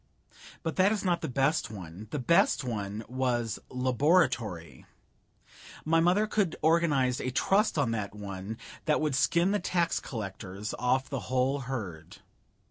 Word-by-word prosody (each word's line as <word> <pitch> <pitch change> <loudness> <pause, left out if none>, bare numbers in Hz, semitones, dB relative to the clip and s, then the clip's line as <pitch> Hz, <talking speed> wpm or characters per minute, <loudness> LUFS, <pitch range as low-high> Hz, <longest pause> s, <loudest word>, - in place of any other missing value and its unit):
But 160 -2 -3
that 190 +2 +5
is 210 -2 -1
not 175 -2 +1
the 160 - -2
best 135 -2 +1
one; 95 0 -9
the 150 - -3
best 150 +2 +3
one 105 -3 -4
was 120 -2 -1
Laboratory. 125 - +1 1.0
My 165 +1 +3
mother 180 +6 +3
could 205 -5 0
organize 150 -6 +3
a 130 - -2
Trust 195 - +2
on 135 -5 +2
that 105 -3 -3
one 100 +1 -6 0.3
that 150 - +2
would 155 -2 0
skin 170 +8 +3
the 205 - +1
tax 175 -3 0
collars 100 -3 -6
off 130 +2 +1
the 135 - -3
whole 130 +2 +1
herd. 105 -12 -6
130 Hz, 145 wpm, -29 LUFS, 110-165 Hz, 1.0 s, that